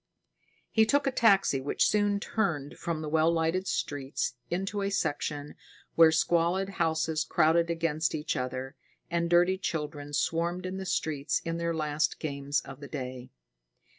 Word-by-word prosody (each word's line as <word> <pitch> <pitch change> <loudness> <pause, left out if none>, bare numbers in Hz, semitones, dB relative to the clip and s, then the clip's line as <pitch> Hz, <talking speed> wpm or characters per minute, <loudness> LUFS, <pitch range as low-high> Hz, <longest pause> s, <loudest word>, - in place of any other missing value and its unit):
He 220 -1 +4
took 285 +4 +2
a 270 - +2
taxi, 195 - +3
which 140 - +1
soon 205 -1 +2
turned 175 -11 -2
from 165 -2 -3
the - - -4
well 160 +2 +3
lighted 170 +3 0
streets 140 -2 -2 0.2
into 195 +3 -2
a 195 - 0
section 150 -5 -2 0.4
where 165 -1 +7
squalid 170 +4 +2
houses 160 -1 +1
crowded 170 +1 +3
against 165 -2 0
each 155 +1 -2
other, 130 +1 -4 0.4
and 170 0 0
dirty 175 +2 +4
children 150 -4 -4
swarmed 170 +4 0
in 185 +1 -4
the 190 -1 -5
streets 155 -5 0
in 165 0 -2
their 170 0 -1
last 155 0 0
games 140 -2 -2
of 135 0 -11
the 140 - -8
day. 130 -3 -6
165 Hz, 155 wpm, -29 LUFS, 145-180 Hz, 0.4 s, where